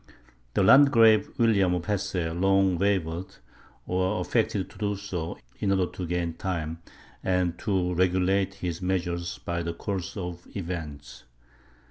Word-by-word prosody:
The - - +3
Landgrave 115 -3 +6
William 100 -6 +3
of 85 -1 -3
Hesse 95 -5 -1
long 95 0 +2
wavered, 95 -3 -1 0.5
or 95 +3 0
affected 105 -4 0
to - - -16
do 105 -1 0
so, 90 -4 -5 0.2
in 100 - 0
order 95 -1 +3
to 90 - -5
gain 85 -1 -1
time, 80 -3 -3 0.4
and 90 -2 +1
to 95 -4 0
regulate 95 +2 +1
his 90 -3 -4
measures 85 -1 -2
by 85 0 -3
the 85 0 -3
course 95 +2 -4
of 90 -2 -6
events. 75 - -6
90 Hz, 135 wpm, -27 LUFS, 85-100 Hz, 0.5 s, Landgrave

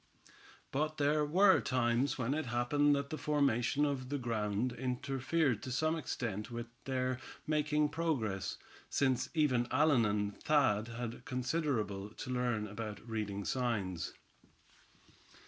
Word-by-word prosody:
But 155 +3 -1
there 150 +1 +3
were 190 +6 +5
times 125 +1 +1
when 130 +1 0
it 155 -3 -2
happened 145 +5 +3
that 140 0 -3
the 155 - -3
formation 145 -1 +2
of 135 -3 -2
the 145 - -1
ground 115 -1 -1
interfered 130 +1 0
to 130 - -5
some 155 +5 +1
extent 110 -9 -3
with 120 -1 -4 0.2
their 130 -1 -1 0.3
making 150 0 +2
progress, 140 - -1 0.3
since 130 -3 +1
even 130 -6 +3
Allan 140 -3 +4
and 105 0 0
Thad 130 -8 +3
had 120 0 -5
considerable 125 -7 -1
to 125 - -5
learn 120 -4 0
about 105 +1 -6
reading 105 -3 -3
signs. 105 -9 -1
125 Hz, 130 wpm, -34 LUFS, 115-145 Hz, 0.3 s, were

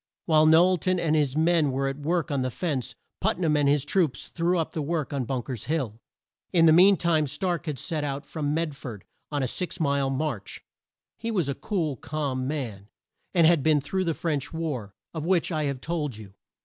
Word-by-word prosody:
While 155 -1 +5
Knowl 175 +4 +6
ton 185 +1 0
and 155 -2 +1
his 145 -2 +1
men 160 -2 +3
were 135 +1 0
at 135 +1 -4
work 165 +2 -1
on 140 -2 0
this 130 -1 -3
fence, 135 -4 -2 0.2
Put - - +1
nam 160 -4 +1
and 145 -1 +3
his 145 -1 +2
troops 165 -4 0
threw 175 +2 0
up 165 - -1
the 155 - -3
work 155 -1 -2
on 135 -3 -1
Bunk 125 -1 -3
er's 125 -6 -5
Hill. 135 -9 -2 0.5
In 165 -2 +5
the 160 - +7
mean 190 +3 +7
time 160 -3 +2
Stark 170 +4 -2
had 150 -3 -2
set 155 +3 -2
out 140 0 -3
from 145 -1 -3
Med 155 -1 -1
ford 120 -7 -8 0.3
on 145 -2 0
a - - +1
six 180 +7 -3
mile 140 -3 +1
march. 135 -7 -3 0.6
He 230 - -3
was 180 -10 0
a - - 0
cool, 160 - -2
calm 135 -4 -3
man, 120 -9 -4 0.5
and 170 -2 +6
had 165 -2 +5
been 155 +1 +4
through 185 +7 -2
the 165 -2 0
French 150 -5 -2
war, 140 -12 -4 0.2
of 160 -2 -4
which 175 +1 +1
I 155 -2 0
have 140 -2 -3
told 150 -8 -3
you. 100 -3 -11
150 Hz, 215 wpm, -26 LUFS, 135-165 Hz, 0.6 s, the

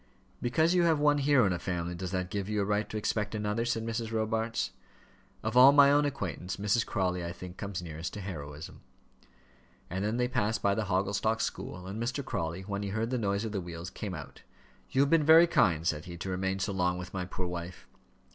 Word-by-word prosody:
"Because 160 +8 +2
you 180 - +4
have 165 -3 +3
one 145 0 +4
hero 140 -4 +4
in 95 - +2
a 90 - -3
family, 90 -1 -3
does 90 +1 -4
that 90 -1 -3
give 100 -1 -3
you 105 -1 0
a - - 0
right 105 +1 0
to 110 - -4
expect 105 0 -1
another?" 105 +2 -1
said 115 -2 -1
Mrs. 115 0 -3
Robarts. 110 +1 -1 0.7
"Of 110 +2 -2
all 130 +2 +9
my 140 -1 +7
own 145 +1 +4
acquaintance, 95 - -3
Mrs. 105 +3 +2
Crawley, 90 -2 -1
I 85 - -4
think, 90 0 -9
comes 100 -3 -4
nearest 80 +1 -5
to 105 - -5
heroism." 75 -5 -7 1.1
And 95 +2 -2
then 110 +3 0
they 125 0 +2
passed 110 -2 -1
by 100 - +3
the 110 +1 -1
Hogglestock 100 +3 0
school, 90 -4 -4
and 100 +4 -5
Mr. 125 +3 -2
Crawley, 85 -6 -3
when 100 +1 -4
he 100 - -3
heard 110 +4 -2
the 125 - 0
noise 100 0 0
of 110 - -3
the 100 -3 -2
wheels, 85 +1 -7
came 100 -3 -5
out. - - -10 0.5
"You 135 - +2
have 140 - +2
been 165 -2 +5
very 160 +3 +8
kind," 85 - +2
said 75 -1 -1
he, 85 0 -8
"to 95 - -5
remain 95 +1 -1
so 100 +1 -2
long 90 -1 +1
with 90 0 -7
my 90 -2 -2
poor 90 +1 -4
wife." 90 0 -6
100 Hz, 225 wpm, -30 LUFS, 90-115 Hz, 1.1 s, all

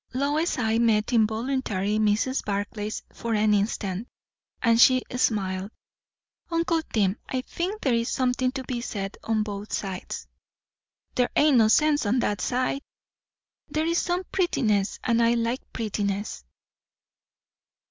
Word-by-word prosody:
Lois's 290 +5 0
eye 225 -2 +1
met 225 0 +2
involuntarily 220 -2 +1
Mrs. 215 +5 +1
Barclay's 205 +1 -3
for 230 -1 -2
an 210 0 +3
instant, 200 0 -1 0.5
and 230 -1 +4
she 255 0 +6
smiled. 195 -5 0 0.8
"Uncle 335 -1 +1
Tim, 200 -2 +1
I 260 - -1
think 370 +10 -4
there 265 - +2
is 230 0 +1
something 255 0 +1
to 265 -1 -4
be 245 -1 -3
said 195 -4 -4
on 220 -1 +1
both 205 0 -6
sides." 190 -2 -4 0.9
"There 250 -1 +2
ain't 295 -3 +5
no 220 -2 +6
sense 295 +1 +3
on 235 +5 +2
that 205 -3 -1
side." 255 +2 0 0.9
"There 310 +2 0
is 335 +1 +2
some 355 +1 -1
prettiness; 215 - +1
and 235 -1 +2
I 230 +1 +4
like 235 +2 -1
prettiness." 205 - -3
230 Hz, 135 wpm, -26 LUFS, 210-260 Hz, 0.9 s, she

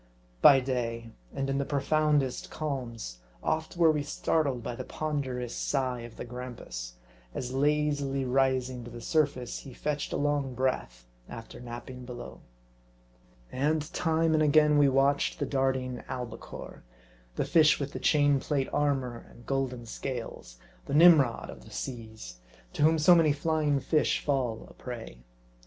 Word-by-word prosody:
By 135 -1 +8
day, 115 -3 -3 0.2
and 135 - -3
in 135 0 0
the - - +1
profoundest 145 -1 +1
calms, 120 - -5 0.2
oft 160 +2 -1
were 165 -2 +6
we 150 -1 0
startled 145 -3 0
by 120 - -4
the - - -6
ponderous 130 -6 -3
sigh 130 -3 -1
of 115 -1 -10
the - - -6
grampus, 115 - -7 0.4
as 125 0 -4
lazily 145 -1 +1
rising 130 -1 +1
to 120 - -9
the 120 0 -9
surface, 140 -3 0
he 130 -3 -11
fetched 150 -1 -2
a - - -1
long 145 -3 0
breath 115 - -2 0.2
after 115 -1 -9
napping 125 +1 -8
below. 120 - -9 1.1
And 150 +5 0
time 160 -1 +2
and 155 - +3
again 150 0 +5
we 145 -1 +6
watched 135 +1 +2
the - - -1
darting 130 -2 -1
albicore, 120 -3 -7 0.5
the - - 0
fish 155 -2 +5
with 140 0 -4
the - - -4
chain 145 -2 +3
plate 135 0 -1
armor 135 -5 -1
and 120 - -16
golden 130 -3 -2
scales; 115 - -6 0.3
the - - -1
Nim 165 -1 +9
rod 120 -4 -3
of - - -12
the - - -14
seas, 110 - -7 0.4
to - - -4
whom 160 +2 +5
so 155 +4 +6
many 160 -4 +5
flying 150 -1 +1
fish 150 +3 +1
fall 130 -6 -1
a - - -15
prey. 115 - -8
135 Hz, 155 wpm, -29 LUFS, 125-150 Hz, 1.1 s, Nim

